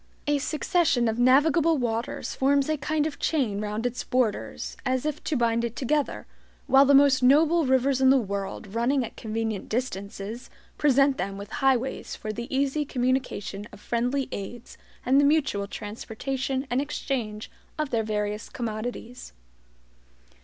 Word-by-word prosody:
A 290 0 +1
succession 305 -4 +1
of 225 +1 -1
navigable 295 +6 +4
waters 235 -1 -2
forms 280 +1 +2
a 310 - +2
kind 300 +2 0
of 310 -2 -4
chain 235 -10 0
round 210 +2 -3
its 245 0 -2
borders, 210 - -1
as 260 0 0
if 305 -1 -3
to 310 - 0
bind 235 -1 +1
it 235 -1 -3
together; 290 +2 -1 0.4
while 270 +1 +6
the 280 0 +5
most 275 -1 +5
noble 305 +4 +4
rivers 265 +1 +2
in 260 - +6
the 270 - +6
world, 200 -2 -4
running 245 +3 +1
at 225 - -10
convenient 220 -2 -3
distances, 215 -1 -4 0.3
present 275 -1 +3
them 195 +2 -3
with 200 +1 -9
highways 265 -2 0
for 215 0 -5
the 235 +2 -5
easy 275 +2 0
communication 250 -6 -2
of - - -13
friendly 245 +5 -1
aids, 235 +5 -7 0.3
and 265 +3 +5
the - - +2
mutual 280 -9 +2
transportation 260 +6 -4
and 250 +2 +2
exchange 245 -7 -4 0.3
of 305 -3 -2
their 230 - +1
various 210 0 -3
commodities. 235 - -6
250 Hz, 155 wpm, -26 LUFS, 220-280 Hz, 0.4 s, while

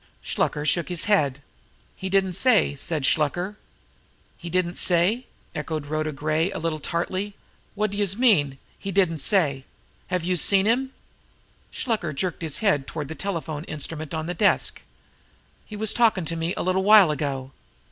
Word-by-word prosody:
Shluker 150 0 -1
shook 155 +3 +1
his 175 -2 -1
head. 140 -10 +1 0.5
"He 190 - -5
didn't 190 -1 +2
say," 220 - +3
said 150 +1 -3
Shluker. 175 +8 +1 0.8
"He 175 - -8
didn't 180 0 -1
say?" 185 +8 +2 0.3
echoed 150 0 -4
Rhoda 155 +1 -2
Gray, 155 +4 0
a - - -5
little 160 -1 -2
tartly. 185 +6 -3 0.4
"Wot 210 0 0
d'youse 200 -2 +1
mean, 160 - +3 0.2
he 195 - -4
didn't 180 -4 +2
say? 140 -4 +2 0.4
Have 180 -2 -1
youse 180 -2 +1
seen 195 -1 +4
him?" 255 +4 +1 0.8
Shluker 215 -10 -2
jerked 180 +3 -3
his 160 -3 -3
hand 145 -9 +2
toward 150 -3 -5
the - - -4
telephone 160 -5 -4
instrument 155 +1 -3
on 160 0 -3
the 175 - -3
desk. 200 +4 +1 0.9
"He 215 - -8
was 215 0 +1
talkin' 220 -7 +3
to 165 - -3
me 165 +2 -2
a - - -1
little 185 +1 +1
while 205 -5 +7
ago." 135 -3 -3
170 Hz, 160 wpm, -24 LUFS, 155-195 Hz, 0.9 s, while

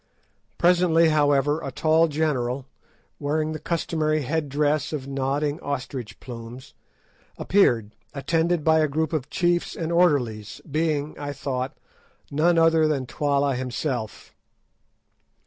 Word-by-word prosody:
Presently, 170 -2 +4
however, 145 0 +2
a 135 - -5
tall 160 +4 +3
general, 140 -4 -1 0.5
wearing 155 +2 -1
the 155 - -5
customary 155 -2 -1
head 150 +2 -2
dress 150 +2 0
of 140 -4 -4
nodding 140 +3 -1
ostrich 130 -6 -5
plumes, 120 +1 -10 0.6
appeared, 120 - +2 0.2
attended 165 +3 0
by 160 0 +4
a 155 - +3
group 160 +3 -1
of 150 -4 -2
chiefs 175 0 0
and 165 0 -3
orderlies, 130 - +1
being, 155 -1 -1
I 145 -1 -4
thought, 130 -2 -4 0.5
none 165 +4 +3
other 165 -1 +4
than 140 -4 -1
Twala 140 +1 0
himself. 125 -2 -4
150 Hz, 120 wpm, -24 LUFS, 135-160 Hz, 0.6 s, Presently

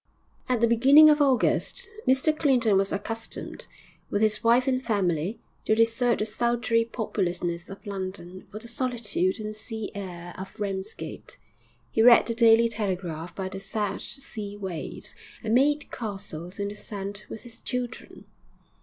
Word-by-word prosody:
At 245 -3 +1
the 235 - +5
beginning 275 +7 +8
of 300 0 +3
August, 270 -3 +2 0.2
Mr 265 +4 +4
Clinton 250 -9 +3
was 195 0 +2
accustomed, 225 +3 -5 0.4
with 205 - +1
his 215 0 +2
wife 240 +3 +4
and 260 -1 +1
family, 195 - 0 0.3
to 215 - +3
desert 230 +2 +3
the 215 - -1
sultry 235 +1 +1
populousness 180 -7 -2
of 195 +3 -10
London 185 -2 -6
for 210 - -8
the 230 +2 -8
solitude 235 -6 0
and 215 0 -5
sea 220 0 -4
air 175 -3 -7
of 190 +2 -9
Ramsgate. 195 0 -5 0.5
He 225 - +2
read 235 +1 +8
the 230 - 0
Daily 230 0 +6
Telegraph 180 -7 -3
by 190 -1 -3
the 195 0 -6
sad 200 0 -3
sea 215 -7 -7
waves, 190 -5 -5 0.3
and 220 0 0
made 290 +4 +3
castles 195 -5 -6
in 200 0 -2
the 205 - -7
sand 205 0 -6
with 220 - -7
his 235 -2 -12
children. 245 -2 -5
215 Hz, 155 wpm, -27 LUFS, 195-235 Hz, 0.5 s, beginning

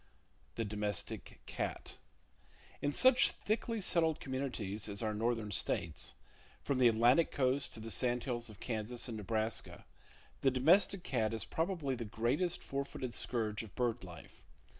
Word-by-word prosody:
The 115 - -1
Domestic 105 0 -3
Cat. - - -4 0.8
—In 145 - +1
such 255 - +6
thickly 225 +1 -1
settled 165 -4 +2
communities 120 -7 -3
as 100 +2 -2
our 110 -1 0
northern 110 -1 -1
states, 85 -4 -1 0.5
from 135 -2 0
the 125 - +7
Atlantic 120 +7 +5
coast 135 +1 +1
to - - -8
the 115 +1 -5
sandhills 120 -1 0
of 105 -2 -12
Kansas 115 +1 -3
and 115 - -4
Nebraska, 110 +1 -2 0.5
the 135 - +4
domestic 175 +8 +4
cat 115 -3 0
is 110 - -3
probably 165 -5 -1
the 120 -2 -3
greatest 125 - 0
four 140 0 -2
footed 130 -3 -6
scourge 110 -3 -1
of 110 -4 -11
bird 120 -2 0
life. 85 -4 -11
120 Hz, 145 wpm, -35 LUFS, 110-140 Hz, 0.8 s, the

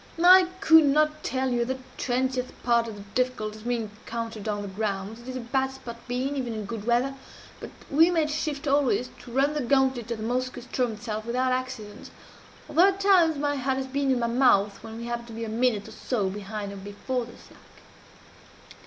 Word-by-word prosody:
"I 365 0 +8
could 320 -5 +7
not 305 +2 +2
tell 260 0 -1
you 240 -1 +1
the 260 +2 -2 0.2
twentieth 255 0 -1
part 235 -1 +3
of 220 - -6
the 200 - -10
difficulties 215 -4 -1
we 245 +1 0
encountered 225 0 -6
'on 205 -1 -2
the - - -5
ground' 200 +1 -3
it 240 - -14
is 255 - -5
a - - -3
bad 265 +3 0
spot 250 -3 -9
to - - -23
be 250 +2 -1
in, 285 - -3
even 250 -4 -2
in 215 -1 -4
good 215 0 -6
weather 245 +3 +2 0.5
but - - -7 0.2
we 320 +4 +6
made 320 -4 +1
shift 300 -1 -3
always 275 -3 +2
to 240 - -12
run 275 +4 +2
the 300 - -1
gauntlet 260 -2 +1
of 235 - -2
the 215 - -6
Moskoe 250 +2 -2
ström 250 -2 -1
itself 215 0 -5
without 255 +2 +1
accident; 255 -5 -4 0.6
although 350 +4 +5
at 390 0 0
times 360 -6 +4
my 290 0 0
heart 265 0 0
has 265 - -2
been 275 +1 -1
in 260 - +3
my 235 - 0
mouth 230 -5 +3
when 225 0 -8
we 235 - -6
happened 235 0 -4
to 230 - -10
be 230 0 -4
a - - -5
minute 225 -2 +1
or - - -10
so 205 -7 -2
behind 205 0 -5
or - - -8
before 205 +6 -4
the 240 - -13
slack. - - -18
245 Hz, 215 wpm, -26 LUFS, 225-270 Hz, 0.6 s, I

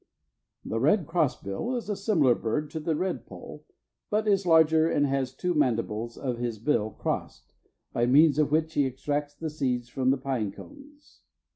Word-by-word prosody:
The 115 - -2
red 160 - +3
crossbill 165 - -1
is 240 - -4
a 210 - -1
similar 190 - +3
bird 145 +7 -2
to 160 - -4
the 155 +1 -1
redpoll, 185 +4 -5 0.4
but 215 0 0
is 195 -2 +2
larger 160 -1 +5
and 145 -2 +2
has 135 -2 0
the - - -31
two 180 0 0
mandibles 115 -5 -1
of 125 -4 -3
his 120 -2 -3
bill 110 -2 0
crossed, - - -5 0.4
by 120 0 +1
the - - +1
means 150 +1 +5
of 150 - +3
which 160 +1 +1
he 140 -2 +2
extracts 145 +3 -3
the 160 0 -5
seeds 125 -5 -2
from 130 0 0
the 135 - +3
pine 130 -6 -2
cones. 290 - -15
145 Hz, 180 wpm, -27 LUFS, 125-165 Hz, 0.4 s, larger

